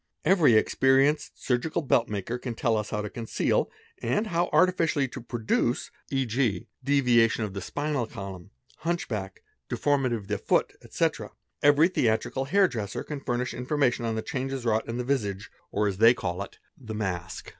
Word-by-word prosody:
very 165 - +5
experienced 135 +6 +3
surgical 155 +6 -1
belt 120 -4 +2
make 100 -3 -3 0.2
can 120 -3 -4
tell 115 -1 +1
us 105 -1 -2
how 105 - -2
to - - -3
conceal 115 +1 0 0.3
and 125 - 0
how 175 -2 0
artificially 165 -6 +3
to 130 0 -8
produce, 120 +1 -1 0.2
e.g. 125 -7 0 0.2
deviatio 125 -5 +3
of 105 -3 -4
the 100 - -5
spinal 145 0 -2
column, 95 -4 -8 0.3
hunch 170 +1 -2
back, 95 -4 -5 0.3
deformity 135 -4 +1
of 105 -4 -7
the 105 -1 -2
foot, - - +1
etc., - - -1 0.3
every 145 +3 +6
the: 180 -9 +1
trical 130 +4 0
hair 195 +4 +4
dresser 105 - -4
can 150 -2 -5
furnish 125 -2 -2
information 125 0 0
on 115 -1 -1
the 110 - -3
changes 130 -1 -3
wrought 110 -1 +1
in 120 +2 -2
visage, 105 -8 -2 0.2
or 105 +1 +1
as 95 -2 -2
they 115 +2 +7
call 90 -6 -3
it, 100 - -8 0.2
the 110 -4 -8
mask. 95 -3 -4
120 Hz, 170 wpm, -27 LUFS, 110-140 Hz, 0.3 s, they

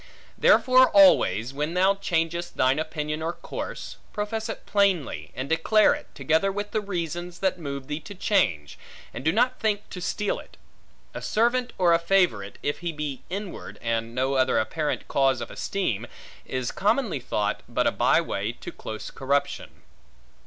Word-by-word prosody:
Therefore 255 0 +5
always, 180 - +5
when 150 +4 -2
thou 190 +2 +4
changest 170 -3 -2
thine 130 +3 +3
opinion 155 -1 -3
or 165 +2 -2
course, - - -7 0.2
profess 220 +2 -3
it - - -6
plainly, 180 - +1
and 130 +1 -4
declare 165 +7 +4
it, - - -7
together 160 +8 +2
with 205 +1 -4
the 215 - 0
reasons 175 -2 -4
that 190 -1 0
move 140 -4 -5
thee 150 +2 -4
to 200 +6 -10
change; 95 - 0 0.3
and - - -6
do 160 - +3
not 245 +6 +2
think 210 -2 0
to 180 - -6
steal 205 +3 -1
it. - - -15 0.6
A - - -6
servant 240 +3 +1
or 175 -2 +4
a 165 - +4
favorite, 170 - +1
if 145 - -1
he 175 -1 -3
be 150 -4 -5
inward, 195 +1 -6
and 115 0 -2
no 130 +2 +1
other 130 -1 +2
apparent 150 +7 -1
cause 135 -2 +2
of 120 - -6
esteem, 120 - -2 0.4
is 130 -2 -2
commonly 205 - +1
thought, 105 -4 -1
but - - 0
a - - +4
by - - +3
way - - -2
to - - -9
close 110 0 -7
corruption. 140 +1 -2
165 Hz, 165 wpm, -26 LUFS, 135-200 Hz, 0.6 s, Therefore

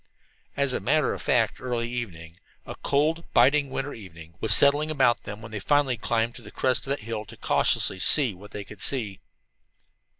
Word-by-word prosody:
As 140 -2 +1
a - - -1
matter 155 +3 +1
of - - -7
fact, 115 -3 0
early 120 -2 -2
evening 90 -9 -7 0.3
a - - -7
cold, 155 +4 0
biting 140 0 +4
winter 135 +2 -4
evening 85 -6 -12
was 110 - +2
settling 145 +7 +5
about 130 -6 +1
them 105 +2 -8
when 115 - -10
they 110 - -5
finally 145 +3 +1
climbed 115 +1 -1
to - - -11
the - - -12
crest 130 +1 -1
of - - -7
that 140 - -2
hill 110 0 -5
to 115 +2 -13
cautiously 95 - +1
"see 130 +1 +4
what 100 +3 -14
they 105 - -7
could 100 0 -13
see." 110 -8 +1
120 Hz, 195 wpm, -25 LUFS, 105-140 Hz, 0.3 s, settling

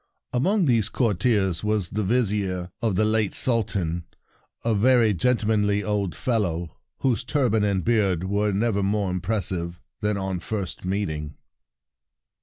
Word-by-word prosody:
Among 185 - +2
these 115 -7 +2
courtiers 105 -6 +1
was 105 -4 0
the 105 - -2
Vizier 100 -5 0
of 110 -5 +1
the 110 - +3
late 110 -2 +1
Sultan, 95 -8 0 0.6
a 115 - +2
very 115 0 +4
gentlemanly 105 -1 +1
old 100 -6 -1
fellow, 90 -9 -1 0.3
whose 125 -3 +1
turban 125 -5 +1
and 100 -3 0
beard 100 -7 +2
were 100 +2 0
nevermore 100 -2 0
impressive 90 -3 -2 0.2
than 105 -1 0
on 95 -2 -2
first 95 -3 -4
meeting. 80 -6 -2
105 Hz, 125 wpm, -24 LUFS, 95-110 Hz, 0.6 s, very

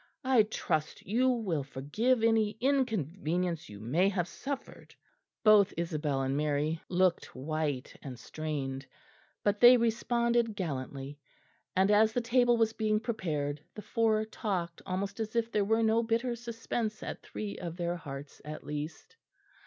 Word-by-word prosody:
I 255 -3 +5
trust 155 -7 -2
you 245 +6 +2
will 210 - 0
forgive 215 - 0
any 220 -2 +3
inconvenience 180 - 0
you 105 -1 -9
may 155 - +2
have 180 -4 -1
suffered." 275 +9 -7 0.5
Both 210 -2 +6
Isabel 150 -5 -1
and 135 +1 0
Mary 150 +2 0
looked 185 -1 +1
white 145 -1 -2
and 130 -3 -7
strained, 135 -2 -4 0.6
but 205 0 +1
they 245 +2 +9
responded 235 0 +1
gallantly; 140 - -4 0.6
and 190 +2 +4
as 215 +1 +5
the 245 - +2
table 240 0 +3
was 225 -1 +2
being 215 -1 +1
prepared 150 - -2
the 210 - -7
four 220 -2 +2
talked 195 -5 -3
almost 195 +4 -3
as 220 0 -3
if 230 0 +1
there 210 -2 +2
were 225 +2 +2
no 225 +1 +4
bitter 235 +2 0
suspense 230 -2 -4
at - - -5
three 210 -2 -6
of 170 -1 -5
their 175 0 -1
hearts 140 -4 -8
at 155 +1 -7
least. 150 - -6
200 Hz, 145 wpm, -31 LUFS, 150-225 Hz, 0.6 s, they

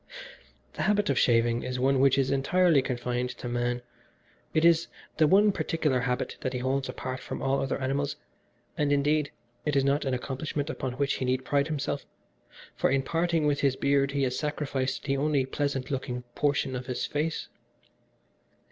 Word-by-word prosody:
"This - - -2
habit 205 -6 +2
of 130 - +1
shaving 115 0 +3
is 125 0 -3
one 135 +1 +3
which 135 0 +4
is 135 -1 +2
entirely 155 +3 +3
confined 125 -1 -2
to - - -6
man. 120 0 -1 0.7
It 155 +1 +2
is 170 -1 +5 0.3
the 155 0 +5
one 205 +5 +5
particular 155 -8 0
habit 125 0 -2
that 130 - -2
he - - -1
holds 130 +2 -1
apart 130 0 -4
from - - -6
all 135 +1 +1
other 135 - -1
animals, 140 +2 -1 0.6
and, 145 -1 +1
indeed, 145 +1 +2 0.3
it 150 -1 -1
is 135 - +4
not 140 +2 +2
an 130 -1 0
accomplishment 140 +4 -3
upon 130 -5 -4
which 140 +2 0
he 130 - -2
need 130 +1 0
pride 140 0 +1
himself, 150 -4 -3 0.7
for - - +1
in 135 0 +2
parting 165 0 +1
with 145 -1 +2
his 135 -2 +2
beard 140 0 +2
he 140 -1 +1
has 130 -1 0
sacrificed 140 -3 -2
the 140 -1 0
only 140 -1 +1
pleasant 135 -1 -2
looking 125 -2 -3
portion 140 -2 0
of 125 0 -5
his 125 - -2
face. 155 +2 -2
135 Hz, 180 wpm, -28 LUFS, 130-150 Hz, 0.7 s, is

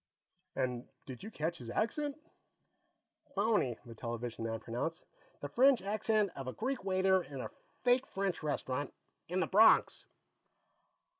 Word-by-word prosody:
And 125 -2 -2 0.2
did 130 -3 -8
you 215 - -6
catch 165 -3 -3
his 120 - -8
accent?" 285 - -1 1.2
"Phony," 200 - +2
the 115 - -9
television 115 0 -5
man 115 0 -2
pronounced. 125 +10 -4 0.4
"The 145 - -3
French 255 - +5
accent 215 0 +1
of 135 -1 -6
a 130 - -3
Greek 260 +1 -2
waiter 190 0 +3
in 140 -5 -8
a - - -5 0.3
fake 245 +1 +4
French 195 -3 -2
restaurant. 145 -2 -2 0.3
In 185 +2 0
the - - +2
Bronx." 210 +4 +5
175 Hz, 140 wpm, -34 LUFS, -, 1.2 s, French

